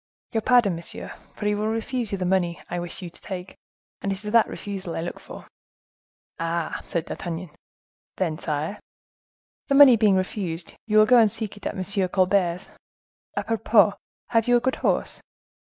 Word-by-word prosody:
"Your 225 - 0
pardon, 230 -6 +4
monsieur; 170 0 -6 0.2
for 210 - -6
he 210 - +2
will 210 +1 -1
refuse 225 +1 -2
you 200 - -1
the 185 - -2
money 180 -2 +1
I 175 - -1
wish 175 +2 -5
you 175 - -7
to - - -16
take; 185 -2 -7 0.5
and 200 - -1
it - - 0
is 210 - -3
that 230 0 +5
refusal 195 -4 -6
I - - -2
look 175 - -5
for." - - -11 0.9
"Ah!" 165 0 -2
said 170 -1 -2
D'Artagnan. 170 -1 -5 0.7
"Then, 165 -4 -1
sire?" 155 +6 -3 0.9
"The 275 - +2
money 275 -4 +9
being 210 -3 +4
refused, 185 -3 -3
you 215 -1 +2
will 215 - +8
go 245 +2 +6
and 220 -2 +5
seek 220 -1 -2
it 205 - -6
at - - -4
M. 190 0 0
Colbert's. 180 -1 +1 0.7
A - - 0
propos, 215 -2 +3 0.4
have 230 -1 +2
you 245 0 +5
a - - +2
good 260 +2 -1
horse?" - - 0
195 Hz, 180 wpm, -24 LUFS, 175-220 Hz, 0.9 s, money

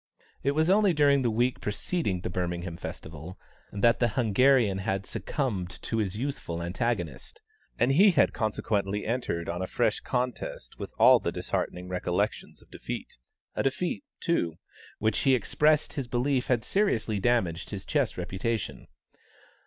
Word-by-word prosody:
It 140 - +1
was 155 +2 +2
only 200 0 +4
during 140 -2 +4
the 120 - +2
week 120 +3 0
preceding 105 - -2
the 90 - -3
Birmingham 85 -1 -3
Festival, 80 +2 -8 0.3
that 115 +4 +3
the 120 - +4
Hungarian 120 -2 +3
had 95 0 -2
succumbed 100 -11 -3
to 115 - -2
his 105 -2 -1
youthful 125 -10 -3
antagonist, 100 - -3 0.4
and 120 +3 +3
he 190 +9 +7
had 160 -7 +3
consequently 105 -2 -1
entered 110 -8 -2
on 85 +1 -3
a 95 - -2
fresh - - +1
contest 125 - -3
with - - -6
all - - +7
the - - -2
disheartening 90 0 -3
recollections 90 +3 -2
of - - -27
defeat; - - -7 0.3
a - - -1
defeat, 170 - -1 0.2
too, 85 - 0 0.4
which 110 0 +1
he 135 -1 +4
expressed 150 +5 +2
his 135 -4 -3
belief 125 +2 0
had 120 -3 +1
seriously 115 - +1
damaged 95 -8 +1
his - - -6
chess - - 0
reputation. 95 +4 -3
115 Hz, 150 wpm, -28 LUFS, 90-135 Hz, 0.4 s, he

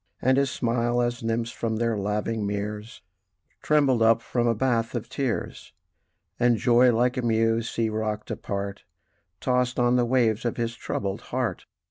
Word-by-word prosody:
And 130 +1 +3
his 140 -1 +1
smile, 120 0 0
as 120 0 -1
nymphs 115 +1 -1
from 115 -1 -2
their 115 0 0
laving 105 +2 -2
meres, 105 +3 -4 0.6
Trembled 140 -6 +3
up 115 0 +4
from 120 -1 0
a 115 - +2
bath 115 -1 0
of 120 - -3
tears; 135 -5 -3 0.7
And 120 -1 +3
joy, 125 +2 +5
like 120 +2 +1
a - - +1
mew 115 -1 +2
sea 115 0 -2
rocked 110 0 -3
apart, 100 0 -4 0.6
Tossed 125 -1 +1
on 120 0 +3
the 120 - +3
wave 115 -3 +2
of 120 - -2
his 120 0 -2
troubled 100 -4 -3
heart. - - -2
115 Hz, 160 wpm, -25 LUFS, 110-120 Hz, 0.7 s, joy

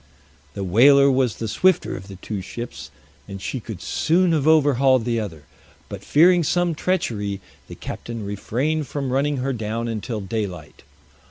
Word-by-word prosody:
The 100 - -3
whaler 140 +9 +6
was 130 -4 +1
the 115 - -4
swifter 185 +11 +2
of 95 0 -9
the 100 - -9
two 100 +1 -5
ships, 120 +6 -7 0.4
and 100 - -7
she 130 - -4
could 110 -4 -8
soon 175 +2 +2
have 155 -2 +1
overhauled 135 -5 +4
the 120 -1 0
other; 85 -9 -6 0.5
but - - -8
fearing 175 +4 +5
some 175 +2 +1
treachery, 110 - -2 0.3
the - - -9
captain 115 -3 -7
refrained 130 +9 -2
from 135 -2 -3
running 140 +2 +1
her 135 +1 -1
down 115 0 -3
until 110 0 -4
daylight. 95 -7 -5
120 Hz, 160 wpm, -22 LUFS, 105-145 Hz, 0.5 s, whaler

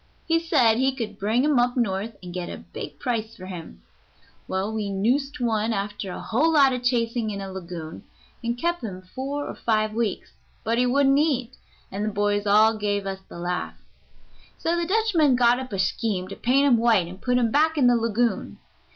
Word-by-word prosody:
He 330 0 +2
said 265 -9 +3
he 265 +1 +1
could 215 -5 -5
bring 220 +5 +1
him 295 -3 +3
up 245 +1 +1
North 215 -1 -1
and 175 -1 -8
get 180 -1 -4
a - - -6
big - - -9
price 225 -3 -3
for 185 - -10
him. 165 - -9 0.6
Well, 195 +3 -2
we 215 -2 -2
noosed 250 +9 0
one 225 -2 0
after 200 -1 -4
a - - -6
whole 240 - +1
lot 275 -3 +5
of 250 - -3
chasing 235 -2 0
in 200 -1 -4
a 195 -1 -6
lagoon, 170 -4 -7 0.4
and 235 +1 -1
kept 345 +2 -1
him 185 -4 -6
four 275 +9 -4
or - - -5
five 215 -1 0
weeks, 225 -3 -2 0.3
but 230 +1 0
he 250 - +3
wouldn't 275 +2 +4
eat, 265 -5 0 0.4
and 200 +2 -3
the 215 - 0
boys 205 0 0
all 215 +2 +5
gave 205 -1 -1
us 195 -1 -4
the - - -9
laugh. 180 +1 -3 0.8
So 335 - 0
the 340 -1 -1
Dutchman 370 - +3
got 245 0 +4
up 260 -2 -7
a 195 - -3
scheme 190 0 -1
to 195 - -6
paint 270 +4 +2
him 260 -4 +5
white 225 -6 +3
and 185 +2 -11
put 250 0 +1
him 235 -2 +2
back 315 +3 +3
in 275 - +4
the 245 0 +5
lagoon. 230 0 0
230 Hz, 205 wpm, -24 LUFS, 200-260 Hz, 0.8 s, lot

